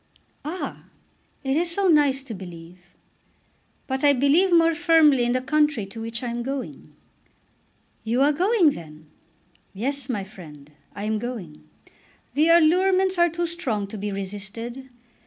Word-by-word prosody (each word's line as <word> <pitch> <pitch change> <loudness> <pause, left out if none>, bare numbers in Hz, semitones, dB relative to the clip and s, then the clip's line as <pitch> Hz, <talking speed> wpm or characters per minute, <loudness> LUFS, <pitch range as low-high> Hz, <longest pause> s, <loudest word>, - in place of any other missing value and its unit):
"Ah; 330 +5 -6 0.6
it 270 0 0
is 335 +2 +2
so 385 +3 +1
nice 290 -5 +3
to 260 -4 -7
believe." 175 -2 -10 1.1
"But 265 +1 -3
I 285 -1 +6
believe 285 +8 +3
more 330 -1 +5
firmly 320 -6 +4
in 240 - +1
the 255 - 0
country 295 -5 +1
to 210 +3 -9
which 230 +2 -5
I 245 - -2
am 240 0 -3
going." 270 +1 -6 1.1
"You 235 +4 +1
are 295 +1 +3
going 365 0 +3
then?" 155 - -11 0.6
"Yes, 270 +5 -3
my 210 -6 -2
friend; 150 -7 -13 0.2
I 200 - -6
am 215 0 -1
going. 210 -10 -7 0.6
The 310 +3 +3
allurements 370 +3 +4
are 345 0 +5
too 340 +2 -2
strong 260 - -2
to 215 - -7
be 205 +1 -3
resisted. 205 +6 -6
265 Hz, 150 wpm, -24 LUFS, 210-325 Hz, 1.1 s, I